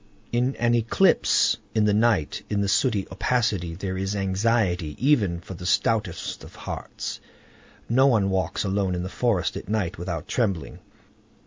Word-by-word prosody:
In 125 +3 +1
an 120 0 +1
eclipse 120 - +3 0.2
in 110 -1 +3
the 105 - +3
night, 105 -7 +2
in 105 -1 0
the 100 - 0
sooty 105 -1 +1
opacity, 100 -5 0
there 95 0 -4
is 95 +1 -2
anxiety 95 -4 0
even 110 -11 +2
for 90 - -9
the 90 0 -6
stoutest 105 -3 0
of - - -13
hearts. - - -6 0.7
No 130 +4 +4
one 105 -7 +3
walks 95 -1 -1
alone 95 -2 0
in 90 - -3
the 95 - -4
forest 105 -5 0
at - - -7
night 100 -7 -1
without 85 -2 -4
trembling. 95 - -1
100 Hz, 155 wpm, -25 LUFS, 90-115 Hz, 0.7 s, No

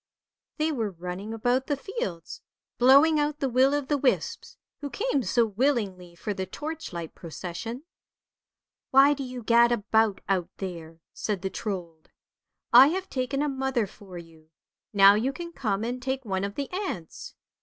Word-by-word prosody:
They 310 +1 +1
were 230 -8 -1
running 180 +3 -6
about 245 +4 0
the 290 - 0
fields, 195 - -5 0.4
blowing 280 +5 +6
out 295 0 0
the 275 - -1
will 260 +3 +3
o' 290 - +1
the 285 +1 -1
wisps, 265 -1 -1 0.2
who 285 - -5
came 410 - 0
so 240 -1 +2
willingly 205 -7 -1
for 210 +4 -4
the 190 -1 -4
torchlight 295 - -6
procession. 185 - -7 0.5
" - - -66
Why 275 +2 +6
do 285 - -6
you 250 -2 -7
gad 235 +1 +5
about 220 -2 +1
out 185 -3 0
there? 165 -4 -7
" - - -66
said 200 -4 -1
the 190 - -2
Trold. 175 -6 -6 0.4
" - - -48
I - - +5
have 375 +4 -3
taken 270 +2 -1
a - - 0
mother 265 -4 0
for 195 -2 -12
you, 165 -2 -14 0.4
now 200 -1 +7
you 230 +6 0
can 340 +4 -7
come 215 -8 -1
and 245 +2 -3
take 265 0 -3
one 190 -2 -2
of 200 +1 -4
the 280 -1 -4
aunts." 365 - -5
235 Hz, 175 wpm, -27 LUFS, 190-275 Hz, 0.5 s, now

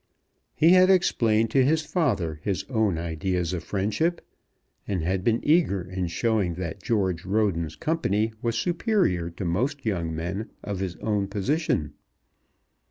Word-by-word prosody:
He 160 - +5
had 185 0 +6
explained 115 - +3
to 135 +1 +4
his 155 +4 +2
father 130 - -1
his 100 0 -2
own 110 -7 +1
ideas 85 +2 -2
of 85 -3 -3
friendship, 110 - -1 0.6
and 95 -5 -1
had 95 +2 -1
been 115 +1 +2
eager 150 - +3
in 90 0 -3
showing 95 -1 0
that 85 -2 -5
George 95 -7 0
Roden's 95 -5 0
company 115 -10 0
was 115 -1 -1
superior 175 - +1
to 85 +2 -6
most 125 - -1
young 85 -6 -1
men 90 +7 -4
of 100 -2 -4
his 95 -2 -3
own 105 -2 0
position. 100 - -1
100 Hz, 145 wpm, -26 LUFS, 90-130 Hz, 0.6 s, had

